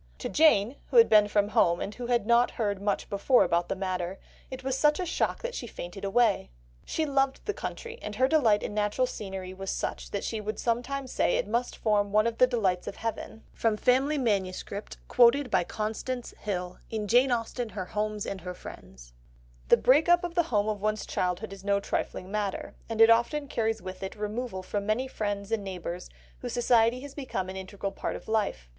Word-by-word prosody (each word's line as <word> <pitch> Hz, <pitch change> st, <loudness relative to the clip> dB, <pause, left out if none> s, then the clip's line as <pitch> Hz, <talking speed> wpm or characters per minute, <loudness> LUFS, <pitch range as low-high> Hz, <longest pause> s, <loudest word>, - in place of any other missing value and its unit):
To -, -, -4 dB
Jane, 280 Hz, -6 st, +4 dB
who -, -, +1 dB
had 460 Hz, -, +8 dB
been 210 Hz, -1 st, +6 dB
from 205 Hz, 0 st, +1 dB
home, 170 Hz, -4 st, +3 dB
and 205 Hz, -, -4 dB
who 245 Hz, +1 st, -6 dB
had 240 Hz, -3 st, +1 dB
not 235 Hz, +2 st, +4 dB
heard 205 Hz, -4 st, -2 dB
much 205 Hz, 0 st, -1 dB
before 205 Hz, +6 st, +3 dB
about 170 Hz, +1 st, 0 dB
the 195 Hz, -, -1 dB
matter, 185 Hz, -1 st, -3 dB, 0.3 s
it 260 Hz, 0 st, -7 dB
was 265 Hz, 0 st, -1 dB
such 300 Hz, +3 st, +3 dB
a 365 Hz, -, -1 dB
shock 340 Hz, -, -1 dB
that -, -, -3 dB
she 240 Hz, -, -5 dB
fainted 185 Hz, -1 st, -8 dB
away... 200 Hz, -, +2 dB, 0.3 s
she 320 Hz, -, -1 dB
loved 275 Hz, -2 st, 0 dB
the 420 Hz, -, -1 dB
country, 470 Hz, +3 st, -6 dB
and 210 Hz, -, -6 dB
her 260 Hz, +4 st, +3 dB
delight 240 Hz, -9 st, +3 dB
in -, -, -4 dB
natural 210 Hz, +4 st, +1 dB
scenery 190 Hz, -6 st, -6 dB
was 195 Hz, 0 st, -6 dB
such -, -, -3 dB
that 200 Hz, -, -3 dB
she 220 Hz, -2 st, -3 dB
would 215 Hz, +1 st, -4 dB
sometimes 255 Hz, +3 st, -2 dB
say -, -, +2 dB
it -, -, -1 dB
must 235 Hz, +3 st, -1 dB
form 205 Hz, -2 st, +1 dB
one 215 Hz, +1 st, +4 dB
of 230 Hz, -1 st, -2 dB
the 255 Hz, -, +7 dB
delights 195 Hz, -8 st, 0 dB
of -, -, -4 dB
heaven." 225 Hz, 0 st, -5 dB
(From 225 Hz, -2 st, +1 dB
Family 265 Hz, +6 st, +2 dB
MSS. 200 Hz, -8 st, 0 dB, 0.4 s
quoted 250 Hz, +2 st, +4 dB
by -, -, +3 dB
Constance 220 Hz, +6 st, -4 dB
Hill, 180 Hz, -3 st, -4 dB
in 215 Hz, -2 st, -3 dB
Jane 250 Hz, +5 st, +4 dB
Austen, 235 Hz, 0 st, -2 dB
Her 195 Hz, -3 st, -5 dB
Homes 210 Hz, +1 st, -2 dB
and 195 Hz, -2 st, -5 dB
Her 180 Hz, +1 st, -6 dB
Friends.) -, -, -12 dB, 0.5 s
The -, -, +6 dB
break 295 Hz, +7 st, +4 dB
up 350 Hz, 0 st, +5 dB
of 350 Hz, -1 st, -3 dB
the 345 Hz, -2 st, +1 dB
home 210 Hz, -2 st, +2 dB
of 210 Hz, -2 st, -2 dB
one's 215 Hz, 0 st, -1 dB
childhood 185 Hz, +3 st, -2 dB
is 195 Hz, -1 st, -11 dB
no 200 Hz, 0 st, +2 dB
trifling 190 Hz, -1 st, -3 dB
matter, 205 Hz, -2 st, -3 dB, 0.2 s
and 225 Hz, -1 st, 0 dB
it 225 Hz, 0 st, +8 dB
often 280 Hz, +6 st, +2 dB
carries 225 Hz, -5 st, -1 dB
with 185 Hz, 0 st, -7 dB
it 190 Hz, 0 st, -5 dB
removal 210 Hz, -1 st, -4 dB
from 200 Hz, +2 st, -3 dB
many 235 Hz, +5 st, +1 dB
friends 205 Hz, -4 st, -3 dB
and 220 Hz, -3 st, 0 dB
neighbours 180 Hz, -2 st, -6 dB, 0.3 s
whose 245 Hz, -2 st, -5 dB
society 240 Hz, 0 st, +3 dB
has 285 Hz, 0 st, -9 dB
become 225 Hz, -10 st, -4 dB
an 190 Hz, -, -6 dB
integral 195 Hz, +1 st, -5 dB
part -, -, -4 dB
of -, -, -9 dB
life. 210 Hz, -, -1 dB
215 Hz, 210 wpm, -28 LUFS, 195-250 Hz, 0.5 s, had